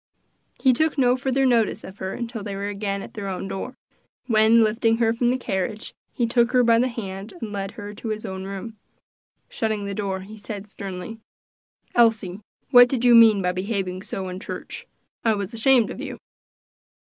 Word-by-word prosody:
He 260 -2 +4
took 315 +4 +1
no 250 -2 +4
further 265 +1 0
notice 235 -4 +2
of 190 +2 -11
her 190 0 -4
until 235 -2 -5
they 200 -1 -5
were 200 +1 -3
again 200 -1 -3
at - - -11
their 205 -2 -5
own 190 0 -4
door, 245 +7 -5 0.5
when, 225 0 +5
lifting 225 +1 +2
her 225 -1 +2
from 240 +1 +1
the 255 - +1
carriage, 210 -2 -3 0.2
he 240 - 0
took 235 +1 +2
her 250 -1 +5
by 230 -1 +4
the 250 - +3
hand 200 - -6
and 215 - -5
led 195 0 -4
her 205 -1 -8
to 225 +2 -8
his 215 0 -3
own 190 0 -5
room. 200 +3 -7 0.7
Shutting 215 -2 -2
the 200 - -4
door, 195 -2 -3
he 210 +3 -11
said 205 -1 -7
sternly, 200 +2 -7 0.7
"Elsie, 220 -5 +2 0.3
what 245 -2 +8
did 250 -2 -1
you 245 - +7
mean 220 -4 +7
by 180 - +2
behaving 185 -1 -3
so 190 -1 -5
in 185 0 -6
church? 210 - -7 0.4
I 225 -2 +3
was 200 +2 -4
ashamed 235 0 +4
of - - -7
you." - - -6
215 Hz, 190 wpm, -23 LUFS, 195-235 Hz, 0.7 s, what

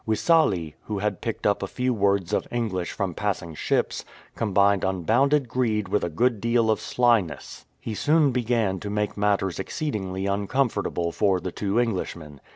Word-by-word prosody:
Wissale, 110 - +2
who 105 -2 -3
Iiad 105 +1 -2
picked 115 - -4
up 100 -1 +2
a 95 - -2
few 125 +5 -1
words 100 -3 +1
of - - 0
English 105 -7 -2
from 95 -4 -3
passing 95 -4 -3
ships, - - -1 0.3
combined 100 -2 +2
unbounded 120 - +2
greed 110 -4 0
with 105 +1 +1
a 85 - -1
good 110 +6 +1
deal 115 -1 +2
of 110 - 0
slyness. 115 -10 0
He 110 - -5
soon 150 +5 +3
began 115 -6 0
to 105 - -6
make 105 0 -1
matters 100 -3 0
exceedingly 95 - -3
uncomfortable 100 -3 0
for 95 0 +1
the 90 +1 -5
two 100 +4 -1
Englishmen. 85 - -3
105 Hz, 160 wpm, -25 LUFS, 95-115 Hz, 0.3 s, soon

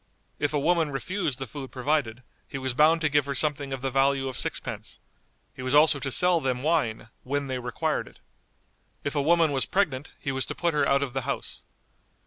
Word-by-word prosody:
If 145 - +1
a 150 - 0
woman 165 +1 +2
refused 145 0 -2
the 135 - -4
food 135 +1 -8
provided, 130 -3 -1 0.2
he - - -6
was 130 -1 -1
bound 155 +5 +4
to 155 - +3
give 145 -1 +2
her 140 - -2
something 145 0 +1
of 135 -1 -4
the 135 - -1
value 135 0 +2
of 130 - -4
sixpence; - - -3 0.6
he - - -9
was 130 +2 0
also 150 -1 +6
to 135 0 -3
sell 180 +3 +3
them 130 -2 -1
wine 135 -9 0
"when 140 +2 -2
they 130 -2 -3
required 125 -1 -2
it." - - -16 0.9
If 140 - -2
a 145 - +1
woman 165 +1 +4
was 135 -2 +1
pregnant, 150 -8 0
he 135 - -2
was 130 0 -2
to - - -5
put 170 -1 0
her 150 - +2
out 140 0 +3
of 130 -3 -4
the 135 - -1
house. 140 +2 -3
140 Hz, 215 wpm, -27 LUFS, 130-150 Hz, 0.9 s, also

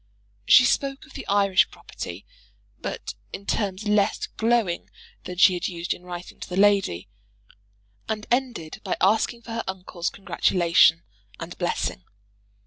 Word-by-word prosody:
She 255 - +8
spoke 275 +3 0
of 310 - -18
the - - -8
Irish 200 -1 +3
property, - - -8 0.5
but - - -5 0.2
in 200 - -8
terms 200 -1 -2
less 210 -1 +2
glowing 225 -6 0 0.4
than 180 - -6
she 190 +1 +7
had 175 - -2
used 170 -1 -3
in - - -12
writing 180 0 -9
to - - -8
the 180 - -4
lady, 195 - +3 1.0
and 215 -1 -2
ended 240 -11 -1
by - - -2
asking 225 +4 +2
for 230 - -9
her 230 0 -2
uncle's 185 -2 -4
congratulation 170 -3 +3 0.4
and 170 +1 -7
blessing. 175 - -2
195 Hz, 140 wpm, -25 LUFS, 175-220 Hz, 1.0 s, She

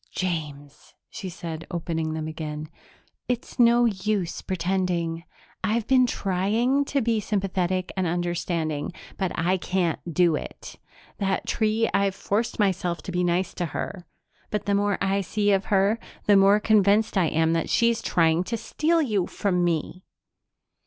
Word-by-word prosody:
"James," 150 -6 -5 0.2
she 190 - -6
said, 165 -2 -7
opening 165 -2 -2
them 155 0 -3
again, 155 -1 -5 0.6
"it's 250 +1 -4
no 240 0 +6
use 200 -4 -1
pretending. 175 -3 -1 0.4
I've 215 +3 0
been 255 0 +4
trying 225 +8 +1
to 280 0 0
be 230 -1 +1
sympathetic 185 -3 -1
and 190 -2 0
understanding, 170 -2 -2 0.3
but 190 -2 0
I 180 +3 +1
can't 180 -2 -1
do 170 -1 +3
it. - - -8 0.4
That 195 -2 0
tree 220 +1 +1
I've 200 -1 +2
forced 215 +4 -1
myself 180 -5 0
to - - -5
be 180 0 0
nice 175 +1 0
to 175 - -2
her, 185 -3 -5 0.4
but 210 - -2
the 200 - +1
more 205 0 +1
I 195 +1 +1
see 205 +2 0
of 195 -1 +2
her, 200 +2 +2 0.3
the 205 - +5
more 195 +1 +6
convinced 210 0 +3
I 185 -4 +3
am 160 +1 +2
that 165 - -1
she's 235 -1 +2
trying 165 -2 +2
to 230 - -2
steal 310 +9 +1
you 210 -9 0
from 180 -3 0
me." 175 +2 -1
190 Hz, 150 wpm, -25 LUFS, 170-210 Hz, 0.6 s, no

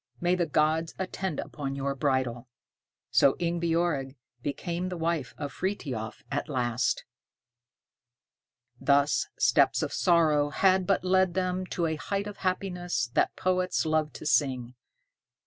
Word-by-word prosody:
May 175 +1 +2
the 175 -2 +1
gods 155 +2 +1
attend 190 -3 -3
upon 135 -2 -4
your 140 0 -1
bridal." 130 -3 -1 0.6
So 135 - +5
Ingebjorg 170 -5 0 0.3
became 170 +6 -3
the 180 - -5
wife 165 -5 -2
of 145 -2 -5
Frithiof 135 - -4
at 145 +3 -2
last. 125 -2 0 1.7
Thus 145 0 +3
steps - - +3
of - - -3
sorrow 155 -4 +3
had 185 +4 +3
but 195 -2 +2
led 185 -1 +3
them 185 0 -1
to 175 - -1
a 160 -1 -1
height 200 +7 -2
of 205 -1 -7
happiness 180 -8 -2
that - - +2
poets 185 -1 0
love 155 -1 +1
to - - -9
sing. 130 -5 +1
160 Hz, 130 wpm, -28 LUFS, 140-180 Hz, 1.7 s, So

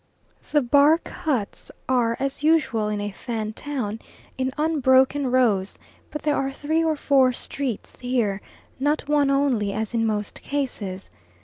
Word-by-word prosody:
The 295 -2 +3
bark 290 +6 +4
huts 255 -11 -3 0.2
are, 240 -3 +1
as 275 +1 -2
usual 295 -9 +2
in 210 -1 -2
a 205 0 -3
Fan 220 0 -4
town, 235 -6 -4 0.4
in 260 0 -1
unbroken 275 -3 +3
rows; 220 -7 +2 0.3
but 300 - -6
there 295 -1 +2
are 270 0 -1
three 310 +4 0
or 320 -1 +1
four 270 -3 +3
streets 255 -3 -5
here, 235 -6 -1 0.4
not 290 +1 0
one 290 -1 +3
only, 265 -8 +1
as 220 +1 -3
in 225 -1 +1
most 210 -1 -3
cases. 215 -10 -3
260 Hz, 145 wpm, -24 LUFS, 220-290 Hz, 0.4 s, bark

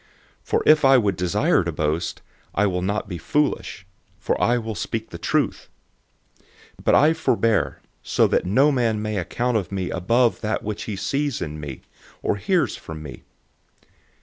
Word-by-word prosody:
012:006 - - -34
For - - +1
if 155 -1 +6
I 135 0 +7
would 105 -5 +1
desire 90 0 +2
to - - -2
boast, 80 +3 -2 0.3
I 105 - +3
will 90 -2 0
not 100 +3 -2
be 90 -4 -6
foolish; 145 - -1 0.3
for - - -1
I 120 +1 +3
will 110 -2 -4
speak 110 +4 -4
the 85 - -8
truth. - - -1 1.1
But - - +4
I 150 - +6
refrain, 115 -9 +1 0.3
so - - +2
that - - +2
no 130 +11 +3
man 115 -5 +1
may 105 0 -2
think 95 +3 -6
more 125 0 +2
of 100 -4 -4
me 95 -2 -2
than 115 +7 +2
that 110 0 -2
which 105 -1 -4
he 105 - -4
sees 140 +7 -1
in 75 -3 -5
me, 70 -3 -7 0.4
or - - 0
hears 180 - +1
from 80 -1 -9
me. 70 - -9
105 Hz, 175 wpm, -23 LUFS, 90-125 Hz, 1.1 s, I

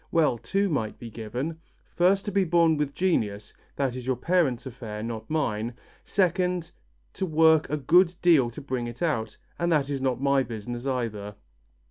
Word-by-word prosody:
Well, 150 -8 +2
two 200 - 0
might 120 - -2
be 115 -2 -9
given: 125 +9 -4 0.4
first 190 +3 +3
to 205 - -2
be 195 0 +3
born 170 -2 +3
with 145 -2 -2
genius 105 - 0 0.2
that 135 -3 -1
is 130 0 -7
your 130 - +2
parents' 145 -3 +1
affair, 115 -4 -6
not 115 +2 -5
mine; 120 -7 -1 0.3
second 180 -2 0 0.4
to 190 - -2
work 160 -1 +4
a 150 - 0
good 170 +6 +4
deal 155 -9 +5
to 120 - -9
bring 130 -3 -3
it 120 +8 -6
out, 110 -10 -1 0.2
and 170 0 +1
that 145 -3 +2
is 135 -2 -2
not 130 -2 0
my 140 0 +3
business 120 +1 -5
either." 110 -6 -3
140 Hz, 175 wpm, -26 LUFS, 120-170 Hz, 0.4 s, deal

